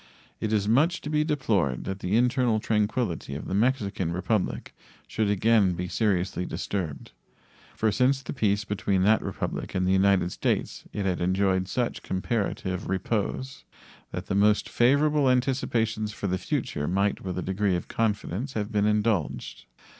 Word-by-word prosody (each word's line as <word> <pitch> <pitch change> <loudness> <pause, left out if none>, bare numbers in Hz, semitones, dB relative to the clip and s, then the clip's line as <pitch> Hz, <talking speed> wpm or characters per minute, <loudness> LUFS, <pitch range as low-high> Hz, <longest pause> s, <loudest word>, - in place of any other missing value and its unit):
It 110 - -2
is 105 -2 +1
much 155 +10 +3
to 150 - -5
be 150 0 +2
deplored 105 - 0
that 95 0 -4
the 95 +3 -1
internal 125 -2 +2
tranquillity 105 - -1
of 75 - -6
the - - -3
Mexican 100 -5 0
Republic 90 +3 -1 0.3
should 110 -2 0
again 105 -1 +3
be 90 +1 -3
seriously 95 -3 0
disturbed, 90 -5 -4 0.6
for 110 -1 +1
since 130 +5 +2
the - - -5
peace 105 -5 +1
between 100 -2 0
that 110 +3 +4
Republic - - -4
and 90 0 +1
the - - +3
United 95 -2 +3
States - - -2
it 100 - -3
had 90 -2 0
enjoyed 95 +1 +1
such 120 +3 -2
comparative 95 -2 -2
repose 105 +7 -2 0.5
that - - -5
the - - -3
most 105 +1 +3
favorable 145 +3 +3
anticipations 120 -4 0
for 105 - -6
the 95 -1 0
future 75 -2 -2
might 100 +3 0
with 95 -1 -4
a 90 - -2
degree 95 0 0
of 85 - -4
confidence 110 +3 -2
have 105 -1 -3
been 105 -1 +2
indulged. 85 - -1
105 Hz, 160 wpm, -26 LUFS, 95-115 Hz, 0.6 s, that